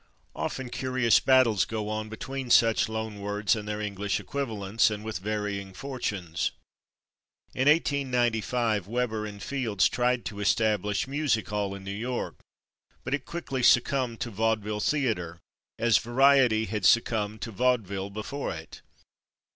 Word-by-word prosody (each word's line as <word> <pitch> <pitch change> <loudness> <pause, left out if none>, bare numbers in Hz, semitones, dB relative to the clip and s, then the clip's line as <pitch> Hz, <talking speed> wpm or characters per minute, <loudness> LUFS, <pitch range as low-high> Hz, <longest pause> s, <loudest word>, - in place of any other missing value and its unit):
Often 130 -2 -4
curious 130 -3 +2
battles 130 -7 +4
go 110 -2 -4
on 110 0 -3
between 130 +4 -5
such 115 -2 +4
loan 110 -1 -4
words 105 0 0
and 105 -1 -6
their 105 0 -3
English 100 -1 -2
equivalents, 110 -7 0
and 105 -1 -5
with 110 -4 -4
varying 100 -1 -3
fortunes. 100 -11 -3 1.0
In 130 +3 +3
1895 120 - +1
Weber 110 -2 -1
and 100 -1 -9
Fields 120 -8 +1
tried 125 0 0
to 100 -1 -5
establish 105 0 +1
/music 135 -4 0
hall/ 100 -2 -2
in 100 - -10
New 100 - -5
York, 120 +5 -4 0.6
but 130 - -3
it 145 -2 -2
quickly 145 -6 -4
succumbed 125 -1 +3
to 120 - -3
/vaudeville 110 0 -1
theatre/, 105 - -1 0.4
as 115 -1 +4
/variety/ 125 -2 +4
had 105 0 -3
succumbed 110 -1 +2
to 115 - -5
/vaudeville/ 100 -4 0
before 115 +7 -4
it. 80 0 -10
110 Hz, 140 wpm, -27 LUFS, 105-125 Hz, 1.0 s, battles